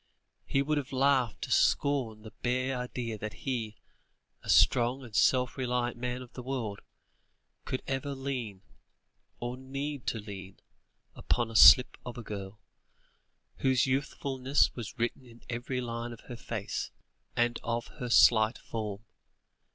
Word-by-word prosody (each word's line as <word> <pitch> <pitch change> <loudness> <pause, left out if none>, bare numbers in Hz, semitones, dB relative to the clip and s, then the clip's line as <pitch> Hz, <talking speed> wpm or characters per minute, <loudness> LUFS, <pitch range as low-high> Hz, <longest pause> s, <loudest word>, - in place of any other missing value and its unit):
He 135 - +2
would 150 +1 +1
have 140 - -7
laughed 130 -3 +2
to - - -5
scorn 125 -7 +2
the 110 - -11
bare 130 +2 0
idea 125 -3 -4
that 110 0 -5
he, 115 -5 -2 0.7
a - - -11
strong 125 +2 +4
and 115 -4 -10
self 125 +5 +3
reliant 125 -1 0
man 125 +1 -4
of 125 - -16
the 125 - -7
world, 125 -6 -3 0.9
could 130 - -3
ever 135 +1 -2
lean, 125 -8 -4 0.8
or 120 +1 -3
need 135 +1 -5
to - - 0
lean, 100 -3 -9 0.5
upon 120 -2 -1
a - - -10
slip 125 +3 +8
of 125 -1 -7
a 120 - -6
girl, 100 -1 -7 1.0
whose 130 -2 +3
youthfulness 135 0 +1
was 115 -4 -7
written 120 +2 -2
in 115 0 -16
every 125 +2 -3
line 120 0 -4
of 115 - -12
her 120 - -9
face, 110 -3 -4 0.5
and 120 0 +1
of 115 0 -2
her 125 - -3
slight 110 -1 +6
form. 105 -2 -5
120 Hz, 145 wpm, -30 LUFS, 115-130 Hz, 1.0 s, slip